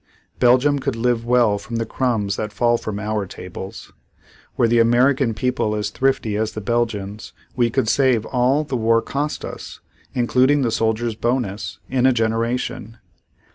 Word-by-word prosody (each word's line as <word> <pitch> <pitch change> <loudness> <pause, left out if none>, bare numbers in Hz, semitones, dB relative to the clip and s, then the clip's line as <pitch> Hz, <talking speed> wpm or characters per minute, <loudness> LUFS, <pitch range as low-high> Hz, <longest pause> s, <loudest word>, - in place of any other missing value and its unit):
Belgium 130 +4 +4
could 135 -2 -2
live 115 0 0
well 120 -4 +3
from 115 +3 -7
the 115 0 -1
crumbs 110 -4 -1
that 105 +1 -4
fall 120 +1 +2
from 110 -3 -4
our 105 -2 -2
tables. 95 +4 -9 0.6
Were 115 - +4
the 120 +1 +3
American 120 +1 +3
people 110 -3 -1
as 105 -1 -2
thrifty 130 -4 0
as 110 0 -1
the - - -4
Belgians, 105 -2 -2 0.2
we 120 -1 +2
could 110 - 0
save 125 -3 +2
all 130 +4 +1
the 140 -3 -4
war 115 -1 +2
cost 145 +2 -3
us, - - -8 0.4
including 130 +3 +3
the 115 - 0
soldiers' 115 +1 0
bonus, 115 -3 -2
in 130 -1 +2
a 130 - +4
generation. 115 0 -2
115 Hz, 160 wpm, -21 LUFS, 110-125 Hz, 0.6 s, Belgium